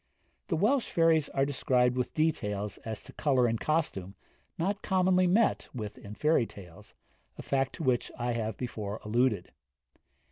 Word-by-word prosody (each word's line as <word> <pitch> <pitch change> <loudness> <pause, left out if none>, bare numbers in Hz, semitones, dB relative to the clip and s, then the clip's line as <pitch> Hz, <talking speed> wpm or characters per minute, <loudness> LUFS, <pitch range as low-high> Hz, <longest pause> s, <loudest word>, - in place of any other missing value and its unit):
The 170 - 0
Welsh 230 - +2
fairies 165 -3 +3
are 135 0 +1
described 125 -3 +2
with 125 -1 -2
details 105 -10 -1
as 110 -2 -6
to - - -12
colour 130 -5 +2
in 115 -1 -1
costume 105 - -1 0.4
not 200 +5 -1
commonly 185 -1 +3
met 215 +6 +2
with 105 -3 -6
in 105 +1 -9
fairy 150 -5 +2
tales, 90 -4 -13 0.4
a - - -7
fact 135 -1 0
to 165 - -6
which 130 -3 +1
I 120 0 -1
have 110 -2 -2
before 110 -4 -4
alluded. 110 -4 +1
125 Hz, 155 wpm, -30 LUFS, 110-160 Hz, 0.4 s, fairies